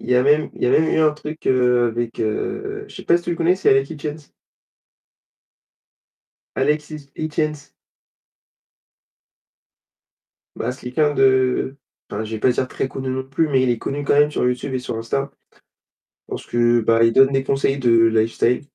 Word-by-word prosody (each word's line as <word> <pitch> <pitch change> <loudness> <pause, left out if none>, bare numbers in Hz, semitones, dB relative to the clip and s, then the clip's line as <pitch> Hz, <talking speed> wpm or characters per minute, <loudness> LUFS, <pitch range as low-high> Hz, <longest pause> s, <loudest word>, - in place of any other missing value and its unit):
Il - - -10
y 125 - +3
a 125 - +4
même 150 +3 +2
il - - -10
y - - +3
a - - +2
même 160 - +4
eu - - +1
un 155 -1 +4
truc 155 +1 -9
heu, 125 -2 +3
avec, 115 0 -4
heu, 405 - -3
je - - -15
sais - - -9
pas 170 - +4
si 175 - -6
tu - - -3
le 170 - -2
connais, 170 +2 +2
c'est - - 0
Alex 135 +2 +2
Hitchens. 150 -1 -7 2.3
Alex 150 +2 0
Hi 155 - -5 0.2
Hitchens. 150 -2 -3 2.8
Bah, 120 - -3
c'est 125 -1 -8
quelqu'un 150 +2 +1
de 130 0 +2 0.3
enfin, 105 +2 -4
je 110 - -8
vais 110 - -4
pas 125 - +3
dire 130 +1 -1
très 130 - -3
connu 135 0 -5
non 130 0 -2
plus, 145 +4 0
mais 135 -3 +2
il 130 - +1
est 120 - +1
connu 145 +5 -4
quand - - +1
même 145 +1 +4
sur 150 - -1
YouTube 125 +2 -2
et 130 - -1
sur 125 -2 -5
Insta. 135 +5 -3 1.0
Parce - - -7
que, 120 0 +2
bah, 115 +1 +3
il 115 0 +3
donne 135 +2 +5
des 135 -1 +1
conseils 135 0 0
de 125 -3 +1 0.2
lifestyle 115 +2 +1
135 Hz, 190 wpm, -20 LUFS, 125-150 Hz, 2.8 s, donne